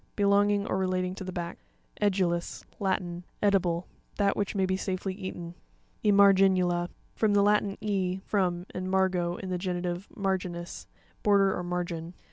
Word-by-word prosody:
Belonging 205 Hz, 0 st, +3 dB
or 190 Hz, -, -1 dB
relating 185 Hz, -1 st, 0 dB
to 190 Hz, -, -7 dB
the 185 Hz, -, -5 dB
back. 170 Hz, -1 st, -5 dB, 0.4 s
E'puuis.—Latin. 185 Hz, -1 st, -1 dB, 0.2 s
Edible; 180 Hz, -4 st, +2 dB, 0.3 s
that 200 Hz, -1 st, +2 dB
which 205 Hz, 0 st, -2 dB
may 190 Hz, -1 st, +2 dB
be 185 Hz, 0 st, 0 dB
safely 190 Hz, 0 st, -2 dB
eaten. 185 Hz, -3 st, -6 dB, 0.5 s
Emarei'nuta.—From 195 Hz, 0 st, +3 dB
the 200 Hz, -, +5 dB
Latin, 205 Hz, -1 st, +2 dB
e, 190 Hz, -3 st, -1 dB
from, 180 Hz, -3 st, 0 dB
and 185 Hz, 0 st, -3 dB
margo, 185 Hz, -2 st, +1 dB
in 190 Hz, -, -6 dB
the 180 Hz, -, -1 dB
genitive, 180 Hz, 0 st, -3 dB
marginis, 185 Hz, -3 st, -3 dB, 0.3 s
border 200 Hz, -2 st, +4 dB
or -, -, -3 dB
margin. 175 Hz, -1 st, -4 dB
185 Hz, 135 wpm, -28 LUFS, 175-200 Hz, 0.5 s, the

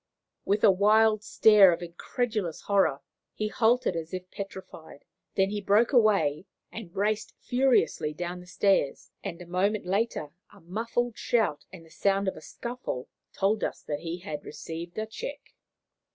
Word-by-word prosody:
With 205 Hz, +1 st, +1 dB
a 210 Hz, -, +8 dB
wild 215 Hz, +2 st, +4 dB
stare 210 Hz, -3 st, +6 dB
of 170 Hz, +1 st, -3 dB
incredulous 190 Hz, +1 st, -3 dB
horror, 195 Hz, -9 st, +2 dB, 0.3 s
he 215 Hz, 0 st, -2 dB
halted 230 Hz, -3 st, +2 dB
as 165 Hz, +2 st, -4 dB
if 185 Hz, 0 st, -8 dB
petrified; 190 Hz, -6 st, -9 dB, 0.3 s
then 195 Hz, 0 st, +2 dB
he 210 Hz, 0 st, -2 dB
broke 210 Hz, +6 st, +3 dB
away 195 Hz, -, +3 dB, 0.2 s
and 220 Hz, -7 st, -8 dB
raced 210 Hz, +2 st, -1 dB
furiously 250 Hz, -, +2 dB
down 175 Hz, +3 st, -5 dB
the 180 Hz, -, -13 dB
stairs, 175 Hz, -6 st, +1 dB
and 170 Hz, -, -5 dB
a -, -, -13 dB
moment 195 Hz, +4 st, 0 dB
later 195 Hz, -5 st, -1 dB, 0.2 s
a -, -, -17 dB
muffled 230 Hz, +6 st, -2 dB
shout 220 Hz, -11 st, 0 dB
and 175 Hz, -3 st, -12 dB
the 160 Hz, -, -20 dB
sound 195 Hz, 0 st, +1 dB
of 190 Hz, -, -1 dB
a -, -, -10 dB
scuffle 235 Hz, -, -6 dB, 0.2 s
told 205 Hz, +2 st, 0 dB
us -, -, -3 dB
that 145 Hz, -1 st, -3 dB
he 170 Hz, +1 st, -4 dB
had 155 Hz, -5 st, -6 dB
received 165 Hz, +4 st, -7 dB
a 215 Hz, -, -1 dB
check. 435 Hz, -, -8 dB
195 Hz, 160 wpm, -28 LUFS, 170-220 Hz, 0.3 s, a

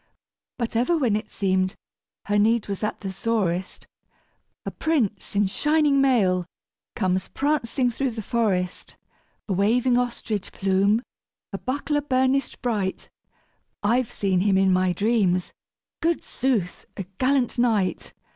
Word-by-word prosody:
But 235 Hz, -2 st, -3 dB
ever 250 Hz, +9 st, +2 dB
when 245 Hz, -9 st, +1 dB
it 215 Hz, 0 st, -4 dB
seemed 185 Hz, -1 st, 0 dB, 0.5 s
her 205 Hz, 0 st, +1 dB
need 225 Hz, +1 st, +2 dB
was 200 Hz, +1 st, -4 dB
at 210 Hz, -, -2 dB
the 195 Hz, -2 st, -4 dB
sorest, 190 Hz, -3 st, -2 dB, 0.8 s
A -, -, -3 dB
prince 240 Hz, -13 st, -1 dB
in 205 Hz, 0 st, +3 dB
shining 295 Hz, +6 st, +2 dB
mail 190 Hz, -10 st, +2 dB, 0.5 s
comes 185 Hz, 0 st, 0 dB
prancing 270 Hz, -3 st, 0 dB
through 270 Hz, +3 st, -1 dB
the 225 Hz, -2 st, -6 dB
forest, 195 Hz, -6 st, -1 dB, 0.5 s
A 200 Hz, -, -1 dB
waving 240 Hz, +6 st, +3 dB
ostrich 235 Hz, -4 st, -3 dB
plume 195 Hz, +4 st, +2 dB, 0.5 s
a 195 Hz, -, -3 dB
buckler 290 Hz, +3 st, -1 dB
burnished 265 Hz, -1 st, 0 dB
bright; 210 Hz, -6 st, -2 dB, 0.7 s
I've 235 Hz, +3 st, +1 dB
seen 190 Hz, -3 st, 0 dB
him 195 Hz, 0 st, +3 dB
in 190 Hz, -1 st, +4 dB
my 185 Hz, 0 st, +2 dB
dreams 190 Hz, -2 st, +1 dB, 0.5 s
good 335 Hz, 0 st, +1 dB
sooth! 235 Hz, -9 st, -2 dB
a 195 Hz, -, -3 dB, 0.2 s
gallant 255 Hz, -2 st, +1 dB
knight. 210 Hz, -7 st, +1 dB
220 Hz, 130 wpm, -24 LUFS, 190-255 Hz, 0.8 s, in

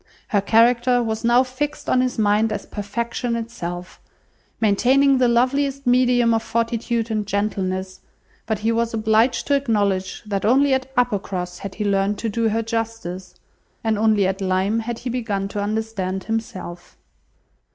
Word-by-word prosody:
Her 205 Hz, -3 st, +2 dB
character 240 Hz, +3 st, +3 dB
was 220 Hz, -1 st, -3 dB
now 240 Hz, +2 st, +5 dB
fixed 265 Hz, +3 st, -4 dB
on 255 Hz, -, +3 dB
his 255 Hz, -1 st, -1 dB
mind 215 Hz, +1 st, +2 dB
as 205 Hz, -1 st, -4 dB
perfection 235 Hz, +3 st, -3 dB
itself, 180 Hz, -6 st, -6 dB, 0.6 s
maintaining 260 Hz, +6 st, +3 dB
the 250 Hz, -, +4 dB
loveliest 275 Hz, +3 st, +1 dB
medium 245 Hz, -1 st, +3 dB
of 225 Hz, -, +1 dB
fortitude 230 Hz, 0 st, -1 dB
and 210 Hz, -2 st, -1 dB
gentleness; 190 Hz, -2 st, -2 dB, 0.5 s
but 220 Hz, -1 st, 0 dB
he 225 Hz, -, +3 dB
was 230 Hz, 0 st, 0 dB
obliged 220 Hz, +2 st, +2 dB
to 285 Hz, -, +2 dB
acknowledge 205 Hz, -8 st, 0 dB
that 200 Hz, -2 st, -2 dB
only 270 Hz, +4 st, +4 dB
at 265 Hz, 0 st, -1 dB
Uppercross 195 Hz, -7 st, -1 dB
had 195 Hz, -1 st, -7 dB
he 210 Hz, -, -3 dB
learnt 200 Hz, +1 st, +1 dB
to 225 Hz, -, -2 dB
do 225 Hz, +1 st, 0 dB
her 225 Hz, +2 st, 0 dB
justice, 225 Hz, -5 st, -4 dB, 0.5 s
and 220 Hz, -1 st, +1 dB
only 215 Hz, -2 st, +3 dB
at 190 Hz, +1 st, -1 dB
Lyme 190 Hz, +3 st, +1 dB
had 230 Hz, +1 st, -4 dB
he 245 Hz, -, -5 dB
begun 210 Hz, -5 st, -2 dB
to 205 Hz, -, -3 dB
understand 205 Hz, -3 st, -2 dB
himself. 220 Hz, -6 st, -5 dB
225 Hz, 155 wpm, -22 LUFS, 200-240 Hz, 0.6 s, now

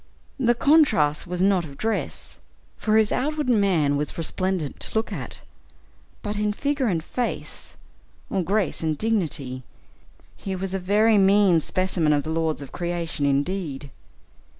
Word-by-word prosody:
The 240 Hz, -2 st, +3 dB
contrast 225 Hz, -, +3 dB
was 180 Hz, 0 st, -3 dB
not 190 Hz, -2 st, +3 dB
of 140 Hz, -4 st, -10 dB
dress 225 Hz, +5 st, -3 dB, 0.4 s
for 215 Hz, 0 st, +1 dB
his 220 Hz, -1 st, +3 dB
outward 300 Hz, +1 st, -1 dB
man 180 Hz, -10 st, +2 dB
was 150 Hz, +1 st, -3 dB
resplendent 175 Hz, -1 st, -2 dB
to -, -, -7 dB
look 220 Hz, -, -1 dB
at; -, -, -7 dB, 0.8 s
but 210 Hz, -1 st, -3 dB
in 210 Hz, 0 st, 0 dB
figure 280 Hz, +2 st, 0 dB
and 170 Hz, -6 st, 0 dB
face, 245 Hz, +7 st, -4 dB, 0.5 s
or 195 Hz, -, -1 dB
grace 195 Hz, +3 st, 0 dB
and 155 Hz, -2 st, -1 dB
dignity, 155 Hz, -, -1 dB, 0.7 s
he 195 Hz, -1 st, -5 dB
was 190 Hz, 0 st, -4 dB
a 195 Hz, -, -1 dB
very 210 Hz, +3 st, +3 dB
mean 195 Hz, -3 st, +5 dB
specimen 180 Hz, -3 st, +1 dB
of 145 Hz, -1 st, +1 dB
the 155 Hz, -, -4 dB
lords 160 Hz, -2 st, -1 dB
of 135 Hz, -, -11 dB
creation, 170 Hz, -4 st, -2 dB
indeed. 145 Hz, -1 st, -2 dB
185 Hz, 150 wpm, -24 LUFS, 155-215 Hz, 0.8 s, mean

